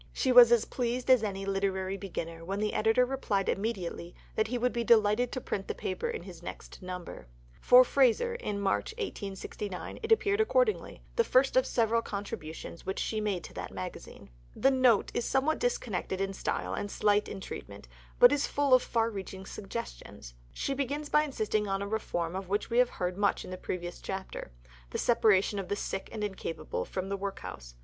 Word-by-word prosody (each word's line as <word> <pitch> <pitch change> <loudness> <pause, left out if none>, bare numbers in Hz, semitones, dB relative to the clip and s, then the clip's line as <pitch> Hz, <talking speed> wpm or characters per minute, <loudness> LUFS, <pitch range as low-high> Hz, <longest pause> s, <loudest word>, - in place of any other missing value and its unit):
She 260 - +1
was 245 -1 +9
as 235 -2 +4
pleased 250 +1 -1
as 255 -3 +7
any 195 -2 -3
literary 195 -1 -1
beginner 170 -4 -6
when 195 +4 -3
the 210 0 0
editor 225 +3 +3
replied 235 -7 -1
immediately 195 -5 -3 0.2
that 220 0 +1
he 245 +2 -2
would 250 +1 +1
be 235 -1 -1
delighted 230 +1 +4
to 255 - -3
print 195 -5 -4
the - - -3
paper 190 - -3
in 460 -1 -4
his - - -11
next - - -9
number. 180 - -7 0.4
In 250 +1 +11
Fraser 275 - +3
for 210 - -2
March 200 - 0
1869 200 - -5
it 445 0 -4
appeared 415 -1 +4
accordingly 440 0 +1
the 465 - +5
first 265 - +3
of 260 - +4
several 230 -1 +2
contributions 200 -7 -6
which 190 - -3
she 215 -1 -1
made 200 -5 -1
to - - -10
that - - -5
magazine. - - -8 0.2
The 270 - +4
"Note" 255 -5 +4
is 240 - 0
somewhat 275 +4 +1
disconnected 485 - -1
in 195 0 -1
style - - -2
and 205 - -3
slight 205 0 +2
in 195 - -6
treatment, - - -8 0.3
but - - +8
is 290 - +1
full 285 -2 +2
of 255 - +7
far 230 -1 0
reaching 190 -1 -7
suggestions. - - -7 0.2
She 275 - -2
begins 285 +2 -2
by 300 - +5
insisting 215 -6 -1
on 195 0 -1
a - - -4
reform 175 -5 -2
of 190 -1 -5
which 205 +3 -1
we 235 - +3
have 250 -1 +5
heard 180 +1 -3
much 200 -1 +1
in 185 - -7
a - - -5
previous 175 -1 -5
chapter: 190 - -6 0.4
the - - -3
separation 210 -4 +3
of 190 - -4
the 205 - -1
sick 195 -1 -4
and 215 -2 -4
incapable 190 -5 -4
from 190 0 -4
the 200 - -1
workhouse. 195 - -6
210 Hz, 195 wpm, -30 LUFS, 190-250 Hz, 0.4 s, In